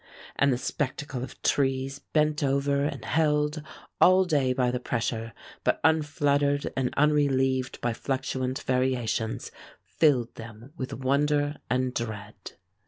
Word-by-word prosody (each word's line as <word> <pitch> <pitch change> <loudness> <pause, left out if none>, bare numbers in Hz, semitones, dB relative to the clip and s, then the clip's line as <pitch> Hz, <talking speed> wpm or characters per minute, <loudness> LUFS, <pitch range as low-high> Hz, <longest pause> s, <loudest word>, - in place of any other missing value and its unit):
And 140 0 +3
the 125 - +1
spectacle 130 -1 -3
of 130 - -9
trees 135 0 0
bent 150 +1 0
over 140 +1 +1
and 150 - -4
held 150 -1 +1 0.4
all 185 +1 +6
day 145 -7 +2
by 125 -1 +1
the 125 - -2
pressure, 115 -2 -2 0.3
but - - +1
unfluttered 145 -2 +2
and 130 -2 0
unrelieved 135 -3 +2
by 120 -1 0
fluctuant 130 +1 -2
variations, 125 -4 -1 0.3
filled 130 -7 +2
them 115 +4 -11
with 130 -5 -5
wonder 145 +2 +1
and 130 0 0
dread." 105 -4 -6
135 Hz, 125 wpm, -27 LUFS, 125-145 Hz, 0.4 s, all